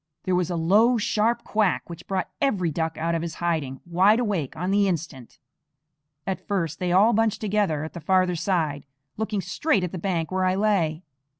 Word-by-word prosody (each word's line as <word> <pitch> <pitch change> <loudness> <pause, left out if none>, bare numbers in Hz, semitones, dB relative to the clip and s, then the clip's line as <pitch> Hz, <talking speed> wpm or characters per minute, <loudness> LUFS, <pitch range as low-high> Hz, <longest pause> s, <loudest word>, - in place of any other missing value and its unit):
There 185 - -1
was 180 -1 +1
a 175 - -2
low, 210 +9 +4
sharp 225 +2 0
quack 210 -4 0
which 170 -1 -10
brought 190 -2 -2
every 190 - +1
duck 160 +1 -2
out 165 +1 -1
of 165 - 0
his 165 -2 -5
hiding, 155 -6 -2
wide 190 +6 +4
awake 200 - -2
on 180 +4 -2
the 200 0 +3
instant. 160 -9 -4 0.9
At 190 - -4
first 165 -5 -2
they 180 -1 -1
all 205 +6 +5
bunched 225 0 +1
together 205 -8 0
at 160 - -7
the 170 - -6
farther 185 +2 +2
side, 160 -5 -1 0.3
looking 215 -2 -2
straight 190 - 0
at 180 - -3
the 185 - -5
bank 170 -3 -2
where 185 0 +1
I 185 0 +2
lay. 185 -6 +1
185 Hz, 195 wpm, -25 LUFS, 165-205 Hz, 0.9 s, all